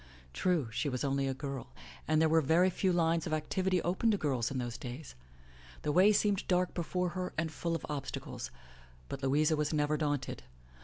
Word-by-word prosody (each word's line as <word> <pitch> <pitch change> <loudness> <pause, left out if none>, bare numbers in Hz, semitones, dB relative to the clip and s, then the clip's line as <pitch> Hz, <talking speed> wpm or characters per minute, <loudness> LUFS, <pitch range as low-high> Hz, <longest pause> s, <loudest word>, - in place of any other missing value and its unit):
True, 170 - +1
she 135 +5 -1
was 125 -2 -2
only 135 -1 +1
a 135 - -1
girl, 135 -2 -5 0.4
and 155 -1 +3
there 160 - +5
were 160 +1 +4
very 170 +6 +4
few 185 +1 +1
lines 165 -1 +2
of 155 - -2
activity 185 +4 0
open 190 +6 +1
to 210 - +3
girls 130 - 0
in 135 - -3
those 120 -2 -3
days. 125 +5 -7 0.7
The 150 - +1
way 185 +7 +6
seem 210 0 +3
ed - - -5
dark 180 0 +2
before 180 +1 -1
her 180 +1 -4
and 160 0 0
full 165 +1 -2
of 165 - -4
obstacles. 140 - -5 0.6
But 135 - -5
Louisa 150 +4 +3
was 150 -1 0
never 150 0 +1
daunted. 145 -3 -2
155 Hz, 200 wpm, -32 LUFS, 140-180 Hz, 0.7 s, way